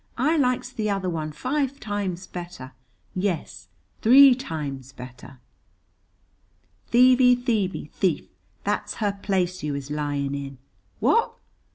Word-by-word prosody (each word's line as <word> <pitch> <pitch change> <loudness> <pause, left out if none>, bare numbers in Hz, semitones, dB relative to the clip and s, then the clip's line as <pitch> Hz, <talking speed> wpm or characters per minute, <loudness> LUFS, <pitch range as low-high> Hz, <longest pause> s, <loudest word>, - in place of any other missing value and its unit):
I 295 +7 +2
likes 250 -3 +1
the 215 -4 -2
other 195 -2 -1
one 155 -2 -3
five 275 - -2
times 200 -5 -3
better; 175 -7 -8 0.4
yes, 180 - -3 0.3
three 265 +3 +8
times 145 - -5
better. 125 +1 -11 1.5
"Thievey, 250 +1 +6
thievey, 225 -6 -2
thief, - - 0 0.4
that's - - -2
her 200 -2 -2
place 185 -2 0
you 150 -1 -2
is 140 0 -6
lying 145 -2 -2
in. 140 -1 -6 0.4
What? 460 0 +2
190 Hz, 120 wpm, -24 LUFS, -, 1.5 s, three